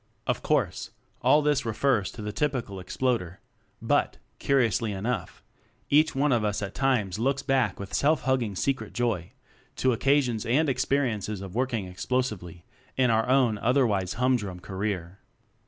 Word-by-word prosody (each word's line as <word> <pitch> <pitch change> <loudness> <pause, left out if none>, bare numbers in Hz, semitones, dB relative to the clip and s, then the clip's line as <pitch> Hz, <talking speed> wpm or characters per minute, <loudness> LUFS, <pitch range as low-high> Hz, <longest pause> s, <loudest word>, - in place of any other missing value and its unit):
Of - - -1
course, - - 0 0.3
all 150 0 +4
this 150 -2 +2
refers 115 -2 +1
to 110 - -8
the 105 0 -4
typ 150 +3 0
ical 105 -7 -5
Exploder; 95 -3 -2 0.4
but, - - +1 0.2
curiously 120 -4 +1
enough, 105 0 -4 0.5
each 155 +1 +4
one 140 +2 +2
of 120 -3 +2
us 105 0 -1
at 100 - -5
times 125 -8 0
looks 135 +3 0
back 130 -8 +1
with 100 -1 -7
self 155 +2 +2
hugging 125 -6 0
secret 135 +7 -2
joy 115 -8 -1 0.4
to 130 - +1
occa 135 +4 +3
sions 115 -4 -2
and 145 +6 +2
experiences 115 -7 0
of 95 -2 -8
working 115 -5 -1
ex 90 0 -8
plosively 100 -10 -2 0.3
in 130 -2 +3
our 110 +2 +1
own 125 -5 +3
otherwise 110 -7 +1
hum 125 +1 +2
drum 95 -5 -6
career. 95 -1 -4
115 Hz, 160 wpm, -27 LUFS, 100-130 Hz, 0.5 s, all